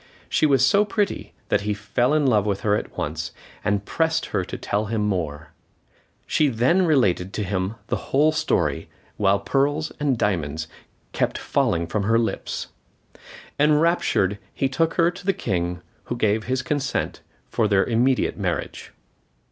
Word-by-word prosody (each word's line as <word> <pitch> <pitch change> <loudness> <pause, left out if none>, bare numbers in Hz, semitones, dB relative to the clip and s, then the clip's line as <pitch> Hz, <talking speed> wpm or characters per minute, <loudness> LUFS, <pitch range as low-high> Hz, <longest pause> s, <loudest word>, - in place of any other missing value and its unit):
She 155 - +2
was 135 -3 +4
so 200 +8 +4
pretty 205 -1 -2 0.2
that 100 - +2
he 105 0 -1
fell 120 +7 +1
in 150 -2 +2
love 110 -6 +4
with 100 -2 -1
her 105 -1 +2
at - - -5
once, 80 +2 -3 0.3
and 100 -1 0
pressed 160 +5 0
her 100 -3 +1
to - - -6
tell 105 +2 -1
him 110 0 -1
more. 80 -7 -2 0.7
She 155 - +2
then 135 +10 +2
related 100 - +2
to 105 - -2
him 95 +2 -2
the - - -4
whole 150 +3 +4
story, 155 - 0 0.3
while 100 -1 +3
pearls 145 +7 0
and 140 -4 +1
diamonds 80 -7 -1 0.4
kept - - 0
falling 85 0 0
from 100 +5 -2
her 115 +3 +2
lips. 115 -1 -2 0.9
Enraptured, 150 - +2 0.2
he 135 - +1
took 160 +5 0
her 170 +1 +3
to 185 - -11
the 195 +1 +2
King, 90 - -2 0.2
who 120 - -3
gave 110 -2 +1
his 130 +1 -1
consent 140 -1 -2 0.3
to 110 - +2
their 100 -2 +3
immediate 125 +3 +1
marriage. - - -3
110 Hz, 160 wpm, -23 LUFS, 100-145 Hz, 0.9 s, was